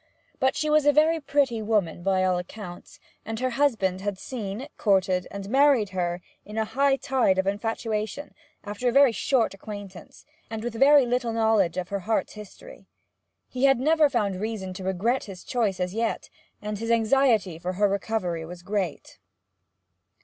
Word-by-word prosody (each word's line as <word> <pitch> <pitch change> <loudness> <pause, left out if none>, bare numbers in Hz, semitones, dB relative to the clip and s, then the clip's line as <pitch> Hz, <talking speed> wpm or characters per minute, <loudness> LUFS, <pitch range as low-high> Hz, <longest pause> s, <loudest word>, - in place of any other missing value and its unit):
But 265 -1 +2
she 310 - -1
was 300 -1 +3
a - - +8
very 315 +3 +3
pretty 275 -6 0
woman, 205 -6 0
by 190 0 +1
all 185 -1 +1
accounts, 180 -1 -10 0.2
and 225 0 -5
her 255 0 -1
husband 220 -9 +1
had 200 -1 -3
seen, 220 +3 -6
courted, 190 -3 +1
and 200 -1 -7
married 265 -3 +4
her 175 -1 -2 0.2
in 210 +1 -9
a 220 - +1
high 270 +5 +2
tide 265 -8 +1
of 190 - +1
infatuation, 215 +5 -3 0.3
after 210 +4 -2
a - - 0
very 275 0 +6
short 235 0 +1
acquaintance, 200 -2 -10 0.2
and 220 -1 -5
with 240 -1 -3
very 275 +3 +6
little 245 -1 -1
knowledge 220 -6 +2
of 185 -1 -3
her 200 - -2
heart's 215 +4 -1
history. 210 - -12 0.6
He 255 +1 0
had 270 -3 +4
never 305 +2 +4
found 205 -7 -1
reason 210 -4 -4
to 185 +1 -8
regret 195 +8 0
his 190 -3 -10
choice 215 -7 -1
as 180 0 -2
yet, 225 +1 -2 0.3
and 210 -1 -4
his 230 +1 -4
anxiety 225 -6 +2
for 180 +2 -3
her 205 +3 +2
recovery 195 -4 -2
was 175 +2 -10
great. 195 -4 -4
215 Hz, 170 wpm, -25 LUFS, 190-255 Hz, 0.6 s, a